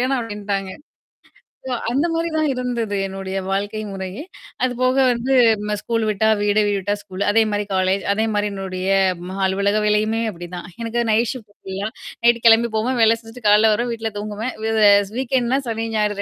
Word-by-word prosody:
வேணாம் 255 0 +1
அப்டின்ட்டாங்க. 205 -3 -4 0.9
சோ 260 - -4 0.2
அந்த 275 +7 +1
மாரி 330 +1 -1
தான் 310 -1 +2
இருந்தது 245 -5 -2
என்னுடைய 195 0 -5
வாழ்க்கை 205 +3 -2
முறையே. 190 +4 -6 0.4
அது 255 - +2
போக 255 +1 +2
வந்து 245 +2 0 0.3
ம 210 - 0
ஸ்கூல் 230 -1 -1
விட்டா 215 +1 +2
வீடு, 205 +1 +2
வீடு 205 - +1
விட்டா 205 +2 -1
ஸ்கூலு. 190 -1 -9
அதேமாரி 210 -2 +1
காலேஜ் 190 +1 +1
அதே 220 +2 0
மாரி 205 0 +1
என்னுடைய 190 -1 -4 0.4
ம 190 +1 -6
அலுவலக 200 +2 +1
வேலையுமே 215 +2 +1
அப்டிதான். 175 0 -8
எனக்கு 230 +1 -1
நைட் 225 +2 +2
ஷிஃப்ட் 215 -5 -12
ஃபுல்லா. 195 +2 -4 0.3
நைட்டு 235 0 +3
கிளம்பி 230 +1 +5
போவேன், 245 +3 0
வேல 225 +1 +4
செஞ்சுட்டு 225 0 -6
காலைல 215 +1 +6
வருவேன், 240 +3 -1
வீட்ல 225 -1 -4
தூங்குவேன். 215 +4 -4
வ 225 - 0 0.4
ஸ் - - -16
வீக்கெண்ட்ன்னா 260 0 +1
சனி 225 0 -2
ஞாயிறு 210 -1 0
215 Hz, 175 wpm, -21 LUFS, 200-235 Hz, 0.9 s, காலைல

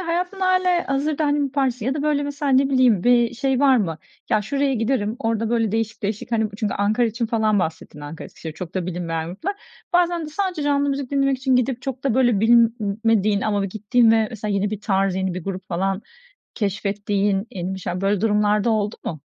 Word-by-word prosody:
hayatında 360 +2 -2
hâlihazırda, 340 -5 +1
hani, 290 0 +1
yapar 275 0 0
mısın 250 -4 -2
ya 270 - 0
da, 295 - -2
böyle, 295 -1 +1
mesela 285 -1 -2
ne 270 +1 +4
bileyim 250 -8 +3
bir 240 -1 +4
şey 265 +1 0
var 270 -2 +5
mı, 165 -8 -1 0.3
"Ya, 215 - +3
şuraya 275 +5 0
giderim, 225 -1 -1
orada 225 -2 -1
böyle 225 -3 +1
değişik 220 -1 -2
değişik, 210 +3 -4
hani" 220 -1 +1
çünkü 210 -2 -2
Ankara 215 +4 +1
için 230 +1 -2
falan 220 -2 +1
bahsettin: 160 -3 -4
Ankara, 145 +2 -8
Eskişehir, 160 -2 -9
çok 180 +1 -8
da 185 -2 -2
bilinmeyen 165 -2 -3
gruplar. 215 - -4 0.4
Bazen 345 -2 +2
de - - -6
sadece 360 -1 -2
canlı 285 0 +1
müzik 275 -1 -3
dinlemek 275 -1 +2
için 260 -1 +2
gidip 250 0 0
çok 265 0 -5
da, 265 -5 +1
böyle, 240 -5 +3
bilmediğin 225 -2 +3
ama 205 -2 0
ve - - -1
gittiğin 215 +4 +2
ve 225 -1 +3
mesela 210 -2 -3
yeni 200 +1 0
bir 210 -1 -4
tarz, 195 -2 +1
yeni 190 -1 -1
bir 180 - -6
grup 190 -1 -5
falan 190 +3 -1 0.5
keşfettiğin, 200 0 -1
yeni 185 0 -4
bir 190 - -6
şeyler, 180 0 -4
böyle 195 0 +1
durumlar 210 -1 +2
da 235 - +1
oldu 210 -1 0
mu? 155 -4 -5
225 Hz, 210 wpm, -22 LUFS, 200-270 Hz, 0.5 s, var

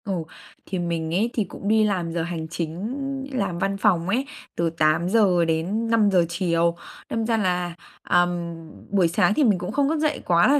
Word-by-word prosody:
Ồ, 185 -5 -2 0.4
thì 185 - -3
mình 165 -2 -2
ấy 210 +7 +2
thì 220 - +1
cũng 195 +1 -8
đi 220 +1 +4
làm 185 -5 0
giờ 170 -1 -1
hành 165 -2 -4
chính, 170 +5 -4 0.4
làm 195 -9 -2
văn 195 +1 0
phòng 190 -4 +2
ấy, 250 +7 +1 0.3
từ 170 0 +1
8:00-5:00 180 +4 +2
chiều, 170 -1 +1 0.3
đâm 225 -1 -1
ra 225 0 +1
là, 180 -4 0 0.3
à, 175 - +4
ừm, 175 -1 -2 0.3
buổi 190 -3 +3
sáng 170 +4 +2
thì 295 - +2
mình 210 -8 +3
cũng 180 - -4
không 280 0 +1
thức 320 0 0
dậy 305 -1 0
quá 170 -1 +4
là 290 +2 +4
180 Hz, 185 wpm, -24 LUFS, 170-215 Hz, 0.4 s, đi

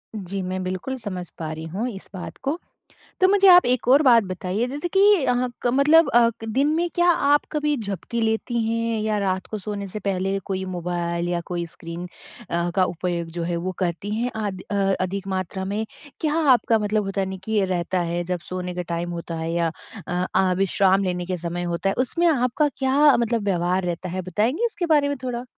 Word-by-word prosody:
जी, 195 -1 -4
मैं 185 0 -3
बिल्कुल 185 +9 -3
समझ 185 -6 -5
पा 160 -1 -4
रही 160 0 -6
हूँ 205 +9 -3
इस 195 -5 -10
बात 185 - -7
को। 295 +6 -1 0.6
तो 370 - +7
मुझे 395 0 +5
आप 360 -1 +8
एक 245 -1 0
और 275 +4 +6
बात 235 -4 +6
बताइए 185 +5 -2
जैसे 290 +6 -3
कि 385 - +6 0.2
हाँ 250 0 +1 0.2
क - - +4
मतलब 320 0 +6
अ, 235 -1 +5
क - - -5
दिन 275 +2 +3
में 345 +1 0
क्या 350 0 +4
आप 290 -3 +4
कभी 300 -1 0
झपकी 215 +1 -4
लेती 225 +1 0
हैं? 230 -1 -1
या 215 -1 0
रात 190 -2 -1
को 215 - -4
सोने 200 0 -5
से 210 +3 -6
पहले 195 0 -1
कोई 190 -1 -2
मोबाइल 175 -1 -2
या 175 -1 -1
कोई 175 -1 -3
स्क्रीन 170 +2 -8 0.4
अ, 170 +1 0
का 190 - +4
उपयोग 175 -1 -2
जो 170 0 -4
है 170 0 -1
वो 180 +2 -3
करती 185 +3 -2
हैं? 240 +2 -1
अध 200 -4 -3
अ, - - 0 0.3
अधिक 195 +1 -3
मात्रा 190 0 -3
में? 210 +3 -2 0.4
क्या 305 -2 +1 0.2
आपका 230 -2 +3
मतलब 210 0 0
होता 195 0 -1
है 190 - -1
न, - - -8
कि 220 - -6
ये 210 -3 +3
रहता 180 0 -1
है, 175 0 -2
जब 180 0 -2
सोने 180 -1 -4
का 180 - -2
टाइम 170 0 -3
होता 170 -1 -5
है 160 0 -3
या 170 -1 +1 0.4
अ 180 +1 -1
अ, 185 -1 +3
विश्राम 195 0 +3
लेने 180 -1 -2
के 185 0 -2
समय 170 +1 -4
होता 175 +2 -1
है। - - -1
उसमें 335 +7 +1
आपका 280 0 +2
क्या 275 +2 +4
मतलब 230 -2 0
व्यवहार 180 -1 +1
रहता 175 +1 -3
है? 185 +2 -3
बताएँगे 220 - 0
इसके 365 -7 -2
बारे 285 -1 +3
में 285 - -2
थोड़ा? 245 -1 -3
195 Hz, 220 wpm, -23 LUFS, 180-245 Hz, 0.6 s, आप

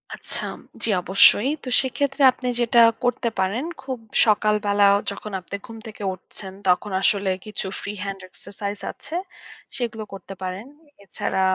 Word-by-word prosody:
আচ্ছা, - - +3 0.4
জি - - +3
অবশ্যই। 195 +6 +6
তো 255 - -5
সেক্ষেত্রে 270 +2 -2
আপনি 250 0 -7
যেটা 235 0 +4 0.2
করতে 245 -1 0
পারেন, 195 +7 0 0.2
খুব 260 -2 -5 0.3
সকালবেলাও 205 -2 +3 0.2
যখন 210 +1 -8
আপনি 185 - -7
ঘুম 230 - -10
থেকে 210 -1 -9
উঠছেন, 190 +1 -9
তখন 180 +3 +2
আসলে 200 0 +2 0.2
কিছু 215 -2 -4 0.2
free 205 +1 -5
hand 195 -1 -5
exercise 200 +2 -7
আছে। 320 - -9 0.6
সেগুলো 225 -3 -3
করতে 195 0 -9
পারেন। 185 +3 -5 0.4
এছাড়া 190 0 -2
210 Hz, 140 wpm, -23 LUFS, 195-235 Hz, 0.6 s, অবশ্যই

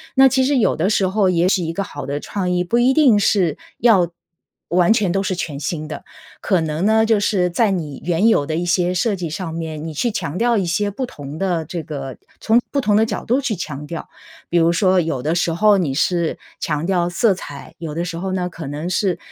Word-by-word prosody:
那 270 0 +7
其 265 0 +2
实 275 +1 +2
有 235 - +2
的 170 +5 0
时 200 -3 +2
候 195 0 +2
也 175 0 +2
许 185 -1 +2
一 165 - -2
个 200 +4 -2
好 145 -7 -7
的 140 +1 -2
创 185 +3 -3
意， 180 0 +1
不 230 +7 +1
一 250 +2 +4
定 265 -7 +5
是 185 -6 +2 0.2
要 200 -8 +4 0.6
完 175 +3 +3
全 210 -6 +2
都 195 - 0
是 195 -1 -2
全 155 -5 -4
新 155 +1 -3
的， 150 -2 -7 0.4
可 190 -4 +2
能 160 +4 -1
呢， 220 0 +4
就 220 -2 +3
是 185 -3 +1
在 220 +4 +2
你 160 -8 -3
原 175 +5 +2
有 145 -11 +3
的 155 - -2
一 175 +2 -1
些 180 0 +1
设 205 +3 +1
计 175 -3 -4
上 165 +1 -5
面， 160 -2 -5
你 160 - -6
去 235 +11 0
强 145 -5 -4
调 235 0 +2
一 195 - 0
些 205 +4 0
不 230 +6 -4
同 145 - -9
的 175 -3 -1
这 165 +1 -5
个 135 -4 -6 0.2
从 225 +2 +4
不 280 - 0
同 210 -5 +2
的 220 +1 +4
角 225 - -4
度 250 +4 +2
去 260 -6 -1
强 150 -4 -6
调， 165 +1 -7 0.4
比 175 - +1
如 165 0 +4
说 185 +1 +3
有 160 -6 -1
的 155 +5 0
时 170 -1 +1
候 205 +4 +4
你 160 -8 0
是 170 +3 0 0.2
强 150 -1 -2
调 175 -2 +1
色 195 +5 +2
彩， 145 -6 -10
有 160 -3 -6
的 170 +3 -2
时 175 -1 -5
候 190 +2 -3
呢， 180 -1 -1
可 165 -2 -8
能 150 +5 -4
是， 185 0 0
180 Hz, 260 characters per minute, -20 LUFS, 160-205 Hz, 0.6 s, 那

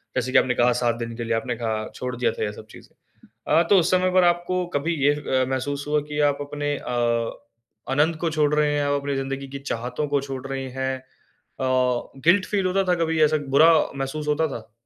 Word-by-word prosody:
जैसे 130 0 -1
कि - - +4
आपने 125 -1 +3
कहा, 120 +1 +4
7 120 -1 0
दिन 115 0 -5
के 120 - -3
लिए 115 0 -1
आपने 120 +2 -2
कहा 110 -2 -3
छोड़ 125 -1 -4
दिया 125 - +1
था - - -4
ये 105 - -1
सब 110 - -11
चीजें। - - -15 0.6
अ, 165 - +6
तो 200 - +7
उस 175 -1 +2
समय 185 0 +3
पर 185 -1 +5
आपको 175 +1 +1
कभी 160 +4 0
ये 145 +1 +5
अ, 135 -3 0
महसूस 140 +2 -2
हुआ 150 0 +2
कि 150 0 -2
आप 140 - -5
अपने 145 0 -3
अ, 120 -3 -1 0.6
आनंद 155 +4 +2
को 170 - 0
छोड़ 150 -1 +1
रहे 150 -1 +2
हैं 145 - +1
आप 145 0 +1
अपनी 140 0 -2
ज़िंदगी 135 0 -4
की 140 +1 -7
चाहतों 125 +1 -3
को 145 0 +1
छोड़ 135 -1 -6
रहे 135 -1 -4
हैं। 130 0 -1
अ, - - -19 1.2
गिल्ट 185 +4 +4
फ़ील 195 -3 0
होता 195 +1 +1
था - - +4
कभी 160 0 -1
ऐसा 155 +1 +3 0.2
बुरा 160 +3 +8 0.3
महसूस 135 +3 -4
होता 155 +2 +2
था? 115 -5 -8
140 Hz, 225 wpm, -24 LUFS, 125-155 Hz, 1.2 s, बुरा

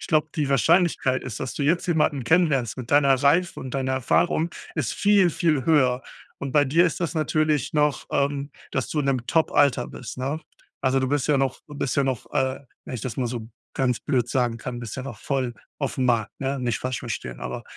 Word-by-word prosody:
Ich - - -7
glaube, 155 -1 +3
die 150 -3 0
Wahrscheinlichkeit 140 - +3
ist, 125 -5 -6
dass 130 - -4
du 145 - -3
jetzt 170 +5 +2
jemanden 150 -6 +1
kennenlernst 150 - +2
mit 125 -2 -7
deiner 140 -1 +5
Reife 145 +7 +2
und 130 0 -7
deiner 130 -1 0
Erfahrung 160 +6 +1 0.2
ist 155 -6 -1
viel, 200 -4 +4
viel 150 -6 +1
höher. 130 -5 +3 0.4
Und 140 - -4
bei 145 +1 +4
dir 160 +6 +4
ist 165 - 0
das 170 -1 -2
natürlich 155 -3 +1
noch, 150 -2 +1
ähm, 140 0 0 0.2
dass 130 - -1
du 155 - -2
in 145 - +1
'nem 130 -3 0
Top-Alter 145 -6 +3
bist, 125 - -8
ne? 140 +5 -2 0.4
Also, 135 0 +2
du 130 - 0
bist 145 0 0
ja 150 - +4
noch 135 -1 -1
du 145 - -10
bist 140 -3 -1
ja 140 - +4
noch, 130 -4 -2
äh, 130 -2 0 0.3
wenn - - -6
ich 120 - -4
das 125 -5 -4
mal 125 - 0
so 115 -2 -5 0.3
ganz 125 -3 0
blöd 125 -5 0
sagen 120 -2 0
kann, 120 +1 -6
bist 115 +2 -6
ja 130 - -5
noch 120 -7 -7
voll 130 -4 -1 0.2
aufm 135 -2 -1
Markt, 115 -4 +1
ne? 135 0 -1
Nicht 120 -3 -1
falsch 130 -1 -2
verstehen, 65 - -5
aber - - -5
135 Hz, 220 wpm, -24 LUFS, 125-150 Hz, 0.4 s, deiner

